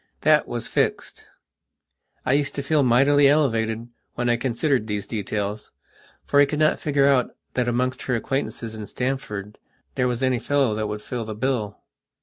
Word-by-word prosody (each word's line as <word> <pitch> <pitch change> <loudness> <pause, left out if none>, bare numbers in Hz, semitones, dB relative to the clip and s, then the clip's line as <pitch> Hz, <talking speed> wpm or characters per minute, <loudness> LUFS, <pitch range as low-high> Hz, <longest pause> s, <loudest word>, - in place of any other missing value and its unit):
That 155 -1 +4
was 120 -1 -4
fixed. - - -1 1.0
I 130 - +2
used 145 0 0
to 140 - -3
feel 150 +1 +2
mightily 140 +3 +5
elevated 115 -6 +1 0.3
when 120 0 0
I - - +3
considered 125 0 0
these 105 -2 -3
details, 105 -1 -4 0.5
for 145 - +3
I 145 - +6
could 150 - -3
not 155 0 +3
figure 140 -2 +2
out 135 -3 +2 0.2
that 125 -1 0
amongst 125 +2 0
her 125 - +2
acquaintances 115 -2 -3
in 110 -2 -7
Stamford 125 -6 -4 0.3
there 125 - +1
was 125 +1 -2
any 130 -2 +2
fellow 140 -5 +1
that 110 0 -2
would 105 0 -5
fill 120 -3 -4
the 110 -1 -6
bill. 110 -3 -2
125 Hz, 170 wpm, -23 LUFS, 110-140 Hz, 1.0 s, I